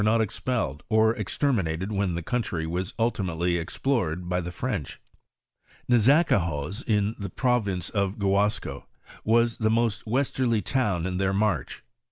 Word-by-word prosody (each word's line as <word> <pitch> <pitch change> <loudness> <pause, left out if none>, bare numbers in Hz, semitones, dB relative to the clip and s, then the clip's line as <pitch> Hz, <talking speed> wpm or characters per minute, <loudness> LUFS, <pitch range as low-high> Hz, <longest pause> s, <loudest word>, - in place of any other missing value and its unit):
XV 110 +2 +3
expelled 110 - -1
or 110 0 +4
exterminated 100 - -1
when 100 -4 0
the 85 - -3
country 95 -7 -2
was 90 +3 -3
nltimatelj 90 -6 0
explored 90 - -1
by 90 0 0
the 90 +1 -5
French. 100 - -4 0.9
!N^azacahoz, 110 - +3
in 105 -1 +2
the 100 -2 -4
province 100 -7 0
of 100 -1 -1
Gu 100 -2 0
asco, 105 +2 0 0.4
was 115 +1 +2
the 110 -1 +2
most 115 0 0
westerly 125 -3 +1
town 100 -8 0
in 90 -1 -2
their 95 0 +1
march. 100 - -1
105 Hz, 140 wpm, -26 LUFS, 90-115 Hz, 0.9 s, or